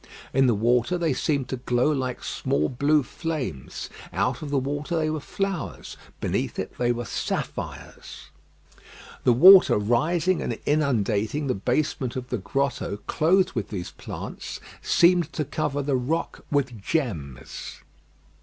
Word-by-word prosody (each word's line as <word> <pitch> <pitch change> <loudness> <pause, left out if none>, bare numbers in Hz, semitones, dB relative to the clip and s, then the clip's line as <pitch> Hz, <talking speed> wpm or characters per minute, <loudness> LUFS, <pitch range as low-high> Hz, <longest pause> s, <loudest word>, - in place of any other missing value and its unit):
In 135 0 +4
the 120 - +3
water 120 - +2
they 165 -4 +1
seemed 140 -1 0
to 130 - -2
glow 125 +3 +1
like 130 -4 -2
small 75 +2 0
blue 145 +3 +2
flames. 135 - -4 0.2
Out - - 0
of 150 - -5
the 140 - +1
water 145 +5 -2
they 155 -1 +1
were 155 - -2
flowers; 195 +2 -4 0.2
beneath - - -2
it - - -5
they 120 0 +2
were 120 0 -3
sapphires. - - -5 0.9
The 125 - +6
water 185 - +8
rising 155 - +1
and 115 - -2
inundating 125 -3 +1
the 130 - +1
basement 125 +3 -1
of 125 -1 -5
the 125 - -1
grotto 120 +1 -1
clothed 185 +4 +3
with 115 -5 -3
these 90 -5 -5
plants, - - -7 0.2
seemed 170 -2 +4
to 150 - -1
cover 145 0 -2
the 135 -1 +1
rock 155 +7 -2
with 135 -7 -1
gems. 85 - -4
135 Hz, 145 wpm, -25 LUFS, 120-155 Hz, 0.9 s, water